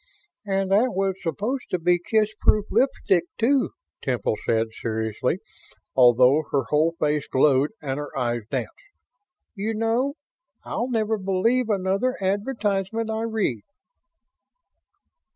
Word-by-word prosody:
"And 195 -1 0
that 225 +4 +3
was 195 0 +1
supposed 210 - -2
to 180 - 0
be 175 +1 +2
kissproof 215 +2 +2
lipstick, 190 -9 +2
too," 260 +3 +2 0.3
Temple 120 -5 -1
said, 115 0 +1
seriously 110 -1 -2 0.6
although 125 +3 +6
her 140 -2 +1
whole 160 +3 +2
face 150 -2 0
glowed 135 +1 +3
and 135 0 -2
her 145 -1 -6
eyes 120 -2 0
danced. - - -3 0.8
"You 220 +1 -3
know, 230 +6 0 0.5
I'll 245 - -2
never 220 -2 0
believe 215 +6 +1
another 200 +6 0
advertisement 205 +1 -1
I 220 0 -2
read." 215 - -1
195 Hz, 115 wpm, -24 LUFS, 145-225 Hz, 0.8 s, although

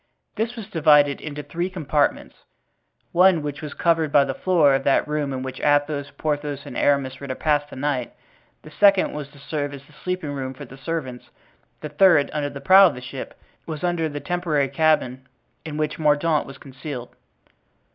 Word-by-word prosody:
This 230 +2 -2
was 225 -4 -7
divided 150 -4 +3
into 150 -1 -6
three 170 +6 -3
compartments—one 170 +2 -1
which 145 -1 -5
was 150 -2 -7
covered 165 -3 +1
by 140 -1 +5
the 135 - -3
floor 160 -3 +3
of 135 - 0
that 140 - +2
room 150 -2 -2
in 130 -1 -4
which 130 -1 -6
Athos, 145 -1 +1
Porthos 145 -2 -3
and - - -9
Aramis 140 -2 +1
were 140 - -8
to 130 - -3
pass 145 0 0
the - - -10
night; 130 -2 -2 0.5
the 155 - -13
second 200 +3 +4
was 150 -2 -5
to 140 +1 -19
serve 145 0 -4
as 140 0 -13
the - - -21
sleeping 180 -5 -4
room 135 -2 -5
for 145 - -9
the 135 - -13
servants, 135 -3 -5 0.5
the 150 - -5
third, 150 -2 +4
under 145 -1 -1
the 140 - -8
prow 190 +5 +8
of 160 - -3
the - - -7
ship, 125 - -8 0.3
was 155 -1 -6
under 175 -3 0
the 145 0 -5
temporary 160 -5 -1
cabin 140 -3 +1 0.4
in 150 -1 -5
which 155 0 -2
Mordaunt 150 +1 +2
was 135 0 -10
concealed. 135 -2 -8
145 Hz, 185 wpm, -23 LUFS, 140-160 Hz, 0.5 s, prow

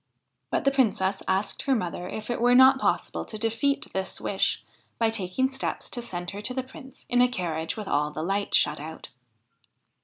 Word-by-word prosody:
But - - 0
the 275 - +4
Princess 200 -7 +1
asked 195 +2 0
her 270 - +2
mother 180 -4 -3
if 220 +2 -5
it 240 - -2
were 245 +1 +5
not 260 +1 +7
possible - - 0
to 215 - -7
defeat 255 +7 0
this 190 0 -3
wish 195 - 0 0.3
by 225 -1 +2
taking 225 +6 0
steps 265 - -3
to 240 - -1
send 175 -6 -5
her 200 +1 -6
to 250 +4 -4
the 260 - -1
Prince 265 0 -14
in 245 0 +3
a 250 - +6
carriage 165 -7 -3
with 210 -2 -5
all 150 +1 +1
the 155 +1 -5
light 200 +3 0
shut 150 0 +3
out. 160 +2 -8
215 Hz, 195 wpm, -26 LUFS, 185-255 Hz, 0.3 s, not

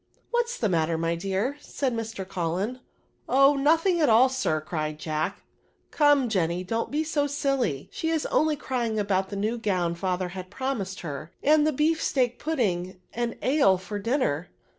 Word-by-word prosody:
" - - -40
What's 480 0 0
the 220 - +1
matter, 165 -3 +1
my 165 +1 0
dear," 195 +10 -2
said 270 -4 -2
Mr. 225 -4 -4
Cullen. 185 +3 -1
*^ - - -19 0.5
Oh! 275 +2 +5
nothing 330 +5 +3
at 300 - +4
all, 235 +4 +6
sir," 255 -12 0
cried 155 -1 -3
Jack; 155 0 -3 0.2
" - - -42
come, 290 -4 +4
Jenny, 180 -4 0
don't 225 +5 -2
be 300 +2 0
so 300 -2 0
silly; 275 - -1
she 320 - -2
is 320 -2 0
only 310 0 +3
crying 245 -6 -2
about 195 -2 0
the 200 - -5
new 215 +4 -1
gown 185 -6 0
father 180 +1 -2
had 185 0 -7
pro 260 +6 -3
mised 195 -5 -5
her, 155 0 -6
and 300 +1 +5
the - - +3
bee&teak 285 -4 +1
pudding 185 - -1
and 240 0 -2
ale 260 -9 +4
for 190 +3 -6
dinner." 200 - 0
220 Hz, 185 wpm, -26 LUFS, 180-280 Hz, 0.5 s, all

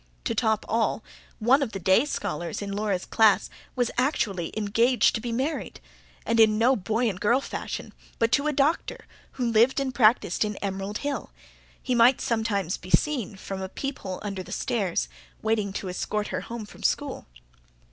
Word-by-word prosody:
To - - -1
top 220 -2 +1
all, 225 -1 0 0.3
one 255 +6 +4
of 250 -5 -2
the 195 - -4
day 190 - +4
scholars 175 - -3
in 200 - -5
Laura's 200 -2 -1
class 220 -3 +3 0.2
was 245 -2 +1
actually 205 - 0
engaged 230 +4 +3
to 220 - -2
be 240 - -4
married; 265 +7 -2 0.5
and 230 0 +1
in 215 -1 +6
no 245 +4 +4
boy 220 +4 0
and 195 -3 -3
girl 235 +5 +3
fashion, - - -6 0.2
but 230 0 +1
to 280 +4 +2
a - - +2
doctor 295 +3 0 0.3
who 245 -3 -1
lived 235 +5 +4
and 270 -2 -2
practised 220 -7 +3
in 210 -1 -2
Emerald 195 +1 -3
Hill: 290 -1 -2 0.5
he 255 - 0
might 245 +2 +5
sometimes 210 -6 -1
be 180 - -12
seen, 250 -5 +1
from 190 0 -6
a 190 - -4
peephole 200 -7 -5
under 200 -2 -4
the - - -10
stairs, 200 - -1 0.4
waiting 215 -2 0
to 195 - -4
escort 210 +3 -2
her - - -2
home 230 -2 -6
from - - -14
school. - - -1
220 Hz, 175 wpm, -26 LUFS, 200-250 Hz, 0.5 s, in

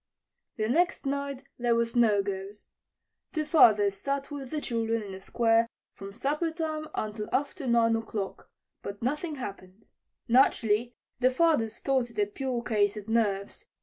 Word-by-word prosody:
The 215 -1 -1
next 335 +6 +1
night 280 -1 -2 0.2
there 240 -1 +2
was 230 0 0
no 215 -4 +4
ghost. 195 +1 -6 0.6
Two 310 -3 -1
fathers 215 - +5
sat 275 +7 -3
with 275 -3 -6
the 305 - -2
children 230 -4 -1
in 200 - -8
the 190 0 -8
Square 230 +2 +2 0.3
from 195 0 -9
supper 290 - -1
time 315 -1 -3
until 215 0 -3
after 285 +1 -1
9 230 -1 +4
o'clock, 210 -3 -5 0.3
but 200 +2 -7
nothing 300 +5 -1
happened. 200 -5 -9 0.4
Naturally, 235 -2 +3 0.2
the 255 0 +4
fathers 255 -6 +2
thought 265 -3 0
it 230 - -17
a 205 - +3
pure 245 +3 -3
case 210 -3 +1
of 210 +1 -8
nerves. 205 -3 0
235 Hz, 155 wpm, -28 LUFS, 210-275 Hz, 0.6 s, fathers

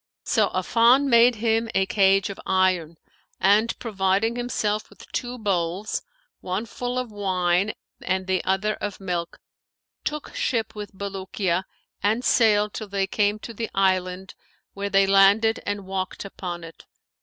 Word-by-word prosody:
So - - +2
Affan 240 +4 +4
made 235 0 +6
him 225 +1 0
a 190 - +3
cage 195 +1 +3
of 195 - -10
iron; 185 -4 +1 0.4
and, 210 +4 +3
providing 200 +1 0
himself 215 -3 -2
with - - -15
two 245 0 -3
bowls, 190 -2 -1 0.4
one 185 +5 -3
full 245 +3 -4
of 250 -3 -3
wine 185 -1 0 0.3
and 190 +1 -1
the 185 -1 0
other 195 +3 0
of 205 -2 -5
milk, 175 -3 -4 0.6
took 300 -1 -4
ship 230 -3 -1
with 210 -2 -8
Bulukiya 190 -2 -2 0.4
and 220 +5 +1
sailed 210 -3 +3
till 215 - -5
they 195 -1 0
came 205 +1 +1
to 230 - -7
the 225 0 -4
island, 185 -1 0 0.4
where 200 0 -3
they 195 0 +4
landed 200 +3 +5
and 205 -1 -3
walked 190 0 -4
upon 175 -3 -6
it. 165 0 -12
200 Hz, 145 wpm, -24 LUFS, 190-220 Hz, 0.6 s, made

